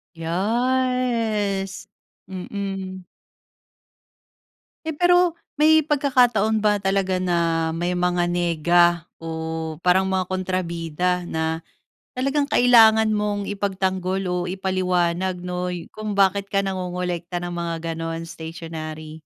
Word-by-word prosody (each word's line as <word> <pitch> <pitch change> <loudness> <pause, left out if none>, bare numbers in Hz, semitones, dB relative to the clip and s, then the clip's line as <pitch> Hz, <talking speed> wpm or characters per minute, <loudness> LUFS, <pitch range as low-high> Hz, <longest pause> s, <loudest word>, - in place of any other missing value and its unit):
Yes 220 +1 0 0.4
mm. 190 0 -5 1.8
Eh, 320 - -1
pero 355 +2 +4 0.2
may 315 +1 +6
pagkakataon 250 -7 +2
ba 210 0 +3
talaga 195 -1 0
na 170 -3 +1
may 175 +2 -1
mga 180 0 +1
nega 175 0 +3 0.3
o 160 -1 -5
parang 180 +2 +3
mga 185 -1 0
kontrabida 180 -1 -1
na 160 -1 -2 0.5
talagang 280 +2 0
kailangan 225 -3 +6
mong 205 -1 -1
ipagtanggol 190 -1 -1
o 180 0 -1
ipaliwanag 185 -1 0
'no, 180 0 -3 0.2
kung 215 -2 -4
bakit 195 0 +2
ka 195 0 +1
nangongolekta 180 -2 -3
ng 175 0 -4
mga 165 -1 -3
gano'n, 165 0 -4
stationary? 160 -1 -7
185 Hz, 100 wpm, -23 LUFS, 170-205 Hz, 1.8 s, may